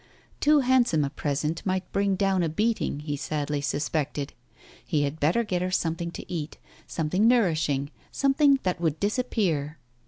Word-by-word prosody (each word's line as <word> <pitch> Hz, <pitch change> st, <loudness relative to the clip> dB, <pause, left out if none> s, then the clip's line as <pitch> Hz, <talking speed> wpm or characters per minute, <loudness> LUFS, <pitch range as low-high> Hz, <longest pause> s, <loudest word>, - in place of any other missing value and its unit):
Too 295 Hz, 0 st, +5 dB
handsome 245 Hz, -, +3 dB
a 140 Hz, -, -4 dB
present 150 Hz, +2 st, -2 dB
might 185 Hz, -1 st, -2 dB
bring 200 Hz, -1 st, +1 dB
down 195 Hz, -1 st, +1 dB
a 165 Hz, -, +1 dB
beating, 210 Hz, -4 st, 0 dB
he 150 Hz, -1 st, -3 dB
sadly 145 Hz, 0 st, -2 dB
suspected; 145 Hz, 0 st, -2 dB, 0.5 s
he 150 Hz, -2 st, 0 dB
had 145 Hz, +2 st, -3 dB
better 170 Hz, +11 st, +2 dB
get 185 Hz, -5 st, -1 dB
her 180 Hz, -, 0 dB
something 170 Hz, -1 st, -1 dB
to -, -, -7 dB
eat, 160 Hz, -3 st, -5 dB, 0.3 s
something 180 Hz, +7 st, +1 dB
nourishing, 155 Hz, -, +2 dB, 0.2 s
something 275 Hz, 0 st, +3 dB
that 180 Hz, -2 st, -1 dB
would 160 Hz, -2 st, 0 dB
disappear. 200 Hz, -, 0 dB
170 Hz, 155 wpm, -26 LUFS, 150-205 Hz, 0.5 s, Too